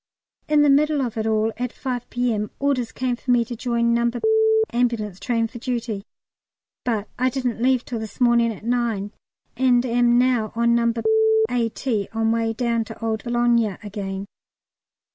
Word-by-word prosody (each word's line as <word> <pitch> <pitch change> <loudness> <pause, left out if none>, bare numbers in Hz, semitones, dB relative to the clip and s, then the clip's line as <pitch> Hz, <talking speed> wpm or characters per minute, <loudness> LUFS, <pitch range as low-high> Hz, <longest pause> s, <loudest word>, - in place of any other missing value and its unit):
In 300 -1 +4
the 295 - +4
middle 300 +1 +3
of 245 -5 -2
it 220 0 -2
all 220 0 +1
at 250 0 -3
5 245 -2 -5
P.M. 230 -4 -1
orders 270 -4 0
came 255 -1 -2
for 255 - -12
me 240 -1 +4
to 240 +1 -6
join 235 0 0
No. 235 0 +2 0.6
Ambulance 230 -6 -1
Train 230 -2 0
for 235 +1 -10
duty, 230 -4 -3 0.8
but 220 -4 -1
I 255 +1 +3
didn't 250 -3 -3
leave 255 0 +2
till 235 -3 -4
this 220 -1 -8
morning 235 -2 +3
at 215 0 -10
nine, 230 -4 -1 0.4
and 250 0 +3
am 240 0 +3
now 245 -3 +2
on 235 0 +2
No. 235 0 +3 0.6
A.T. 230 -2 -1
on 225 0 +1
way 230 0 0
down 235 0 0
to 225 0 -8
old 220 -1 -2
Boulogne 240 -4 +1
again. 195 -1 -5
235 Hz, 165 wpm, -22 LUFS, 225-245 Hz, 0.8 s, In